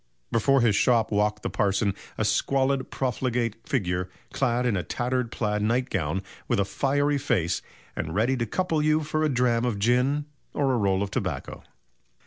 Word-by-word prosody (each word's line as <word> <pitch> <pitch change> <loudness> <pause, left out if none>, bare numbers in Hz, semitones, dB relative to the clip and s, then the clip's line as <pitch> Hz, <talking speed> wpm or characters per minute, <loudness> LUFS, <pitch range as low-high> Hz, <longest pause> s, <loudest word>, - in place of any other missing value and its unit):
Before 135 +3 +3
his 115 -4 +3
shop 115 +1 +3
walked 105 0 +1
the - - -1
parson 100 0 +1 0.2
"a - - 0
squalid, 135 -1 +1
profligate 125 -3 -1
figure, 90 -7 0 0.2
clad 125 -2 +1
in 120 -4 +2
a 90 - 0
tattered 125 +3 -2
plaid 105 -2 -1
nightgown, 95 - 0 0.2
with - - +1
a 100 - +2
fiery 140 +7 +1
face, 85 - 0 0.3
and 80 +2 -4
ready 115 +6 +2
to 120 -1 -1
couple 165 - 0
you 155 +1 +3
for 155 +1 -1
a 155 - +2
dram 125 -3 +2
of 120 -4 0
gin, 125 +7 +2 0.3
or 135 -3 +2
roll 100 -3 +2
of 100 - -5
tobacco." - - -3
120 Hz, 165 wpm, -26 LUFS, 100-135 Hz, 0.3 s, Before